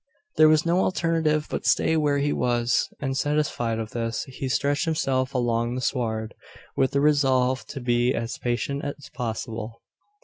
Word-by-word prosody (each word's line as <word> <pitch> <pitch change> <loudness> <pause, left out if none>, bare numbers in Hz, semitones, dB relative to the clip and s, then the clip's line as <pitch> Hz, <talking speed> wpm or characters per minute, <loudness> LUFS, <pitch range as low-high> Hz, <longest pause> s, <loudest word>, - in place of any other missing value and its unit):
There 155 0 +7
was 155 0 +4
no 170 +2 +2
alternative 165 -4 +1
but - - -3
stay 160 - +3
where 150 -2 +2
he 145 +1 +1
was; 120 -1 +1
and, 135 -2 -2
satisfied 145 -6 0
of 110 -1 -5
this, 115 -1 -2
he 130 0 -6
stretched 145 +4 +1
himself 135 -4 0
along 120 -1 0
the 130 - -3
sward, 110 -3 -2 0.4
with 130 - +1
the 140 - +2
resolve 130 -3 +2
to 140 - -6
be 120 0 +2
as 115 +1 -4
patient 125 +3 -2
as 145 0 -6
possible. 115 -1 -5
130 Hz, 165 wpm, -25 LUFS, 120-145 Hz, 0.4 s, There